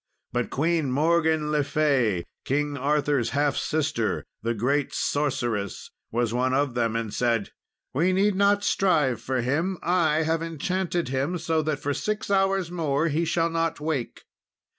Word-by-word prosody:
But 120 -1 -1
Queen 160 -1 0
Morgan 160 +1 +2
le 150 -1 +2
Fay, 135 - +1 0.2
King 145 +2 -1
Arthur's 145 -2 +1
half 145 -1 +2
sister, 145 -10 -1 0.2
the 115 +1 -1
great 135 +6 0
sorceress, 120 -8 -1 0.2
was 120 0 0
one 130 +1 +1
of 140 -2 +1
them, 115 -2 0
and 115 -2 -2
said 115 -4 0 0.4
"We 170 +7 +2
need 200 +2 +3
not 200 +1 +3
strive 150 - +2
for 130 0 -1
him, 160 +10 0
I 160 -3 +2
have 160 +1 0
enchanted 170 0 -2
him, 135 +7 -1
so 160 -1 0
that 155 -1 -1
for 145 - -1
six 210 +5 -3
hours 195 -2 +2
more 160 -2 0
he 160 +3 0
shall 165 0 +1
not 165 -1 -1
wake. 150 -6 -3
150 Hz, 155 wpm, -25 LUFS, 130-165 Hz, 0.4 s, need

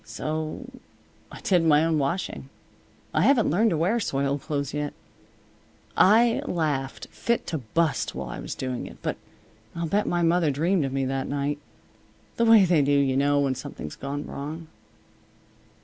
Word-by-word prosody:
So 155 +9 -4 0.7
I - - -10
did 180 -3 +2
my 155 -1 +4
own 160 -2 +1
washing. 145 +7 -3 0.6
I - - +2
haven't 255 - +4
learned 215 +7 +3
to 165 - 0
wear 190 +9 +1
soiled 140 -6 -1
clothes 140 -3 -3
yet. 150 0 -3 1.0
I 230 +4 +5
laughed 145 -6 -2
fit 235 0 -1
to 160 - -3
bust 150 +6 -1
while - - -5
I - - -6
was - - -6
doing 130 -2 -4
it. - - -12
But - - -2 0.6
I'll 170 0 -2
bet 200 +6 0
my 175 0 +1
mother 170 -1 +3
dreamed 160 +4 +1
of 135 - -3
me 135 0 -1
that 135 0 -2
night. 145 +1 -2 0.8
The 230 - +3
way 225 -4 +7
they 170 -4 +3
do, 140 +1 +1
you 140 -2 +3
know, 145 +1 +3
when 135 -2 +1
something's 75 -11 -7
gone 140 +1 -5
wrong." 155 +3 -7
155 Hz, 165 wpm, -25 LUFS, 140-175 Hz, 1.0 s, way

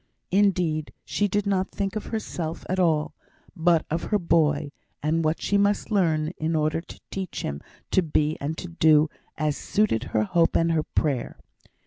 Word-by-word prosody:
Indeed, 180 -6 +2
she 205 - 0
did 205 +1 0
not 190 -2 +1
think 195 0 -3
of 215 - -4
herself 170 -7 -4
at 185 +1 -1
all, 160 -4 +2 0.4
but 170 -1 +3
of 165 +2 -1
her 210 - +2
boy, 155 -5 +2 0.3
and 160 +2 +1
what 155 +1 +1
she 200 - +1
must 205 +2 +1
learn 160 -6 +2
in 160 +1 0
order 155 +1 +1
to - - -13
teach 190 -2 -4
him 70 +1 -4 0.3
to 190 - +4
be 155 -2 +1
and 155 +3 -3
to 180 - -5
do 160 -2 +4 0.3
as 150 -2 0
suited 200 - 0
her 110 -4 +1
hope 165 +8 +2
and 165 0 +3
her 160 -1 +2
prayer. 145 -4 -1
165 Hz, 175 wpm, -25 LUFS, 155-190 Hz, 0.4 s, to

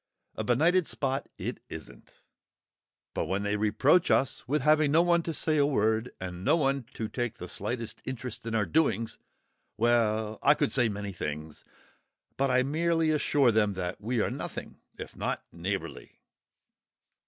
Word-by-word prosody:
A 110 - -4
benighted 160 - +3
spot, 135 -1 -2
isn't - - -6 0.4
it! - - -26 0.9
But - - -1
when 95 +3 -1
they 100 0 0
reproach 110 - +3
us 135 - +1
with 145 +1 0
having 155 -1 +4
no 165 +3 +5
one 170 -1 +3
to 165 - -3
say 155 0 0
a 145 - +4
word, 110 -3 +1
and 90 -1 -6
nobody 140 0 +2
to 110 - -3
take 120 0 -3
the 90 - -7
slightest 115 +5 -5
interest 125 -2 -5
in 115 - -2
our 105 -2 +2
doings—well, 110 -4 -1
I 145 - +5
could 145 - 0
say 120 -4 +3
many 100 -1 -4
things! 75 -2 -6 0.7
But 135 0 +1
I 130 0 +3
merely 165 +3 +1
assure 145 -4 +3
them 105 -2 +2
that 90 +1 -4
we 115 +2 0
are - - 0
nothing - - -6 0.2
if - - -8
not - - -2
neighbourly! 85 -8 -5
120 Hz, 155 wpm, -29 LUFS, 105-145 Hz, 0.9 s, no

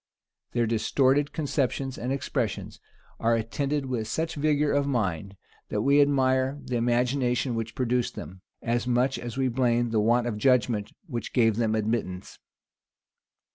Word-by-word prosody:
Their 120 -1 +2
distorted 130 +6 +2
conceptions 135 -3 -1
and 125 +2 -4
expressions 135 -4 -3 0.4
are 115 +1 +2
attended 140 +5 -1
with 120 -4 -3
such 160 0 -2
vigor 150 0 +1
of 140 0 +1
mind, 100 - -2 0.3
that 105 - -1
we 140 +2 +5
admire 135 -1 +2
the 125 - -5
imagination 125 +1 +1
which 115 0 -4
produced 125 -1 0
them, 90 +4 -9 0.2
as 120 +1 0
much 125 +2 +1
as 120 0 -6
we 135 -1 +2
blame 120 -1 +1
the 110 - +2
want 120 +3 +3
of 110 -3 -3
judgment 120 -4 +2
which 120 - -5
gave 115 -4 +3
them 110 -2 +1
admittance. 105 -4 -3
125 Hz, 145 wpm, -27 LUFS, 115-135 Hz, 0.4 s, we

